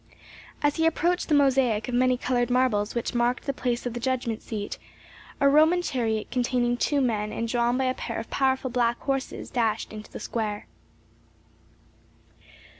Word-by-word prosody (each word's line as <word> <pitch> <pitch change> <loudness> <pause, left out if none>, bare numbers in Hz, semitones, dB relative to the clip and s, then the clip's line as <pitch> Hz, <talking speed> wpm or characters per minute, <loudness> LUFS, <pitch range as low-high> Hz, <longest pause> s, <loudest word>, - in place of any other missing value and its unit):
As 290 0 +2
he 325 0 +3
approached 345 +2 0
the 300 - +4
mosaic 265 -6 +3
of 250 - -4
many 255 +1 +3
colored 245 -1 0
marbles 245 -4 +1
which 235 - -2
marked 240 +1 0
the 275 - -1
place 245 -2 -2
of 245 - -2
the 240 - -4
judgment 245 -3 -2
seat, 205 -2 -5 0.6
a 280 - +4
Roman 315 +5 +5
chariot 225 -7 -1
containing 245 -1 +1
two 280 +3 +1
men 215 -4 0
and 230 - -3
drawn 240 +1 +1
by 265 - +1
a 255 - +1
pair 230 -2 -5
of 225 - -5
powerful 265 -1 +1
black 235 -1 +1
horses 270 -1 -3
dashed 225 -3 -1
into 215 0 -9
the - - -7
square. 210 -3 -3
245 Hz, 170 wpm, -26 LUFS, 230-265 Hz, 0.6 s, Roman